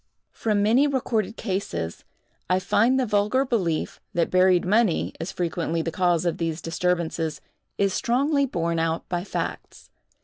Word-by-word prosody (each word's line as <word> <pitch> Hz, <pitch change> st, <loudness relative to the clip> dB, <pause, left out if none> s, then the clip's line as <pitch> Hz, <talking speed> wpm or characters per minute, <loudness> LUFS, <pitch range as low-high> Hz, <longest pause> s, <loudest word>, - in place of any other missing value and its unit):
From 210 Hz, -2 st, 0 dB
many 240 Hz, +7 st, +4 dB
recorded 230 Hz, -6 st, -1 dB
cases, 85 Hz, -, -3 dB, 0.4 s
I 185 Hz, -, +4 dB
find 225 Hz, +7 st, +2 dB
the 260 Hz, -, +1 dB
vulgar 210 Hz, +5 st, +2 dB
belief, 185 Hz, -, -1 dB
that 170 Hz, -1 st, +1 dB
buried 185 Hz, -1 st, +4 dB
money 210 Hz, -1 st, +2 dB
is 165 Hz, -, -4 dB
frequently 165 Hz, -1 st, -2 dB
the 165 Hz, -, -3 dB
cause 175 Hz, -1 st, +1 dB
of 170 Hz, -, -1 dB
these 165 Hz, -1 st, -2 dB
disturbances, 165 Hz, -1 st, -1 dB, 0.4 s
is 195 Hz, -1 st, +1 dB
strongly 280 Hz, +4 st, +1 dB
borne 170 Hz, -6 st, -1 dB
out 165 Hz, 0 st, -1 dB
by 175 Hz, -1 st, -1 dB
facts. -, -, -5 dB
185 Hz, 145 wpm, -25 LUFS, 165-225 Hz, 0.4 s, many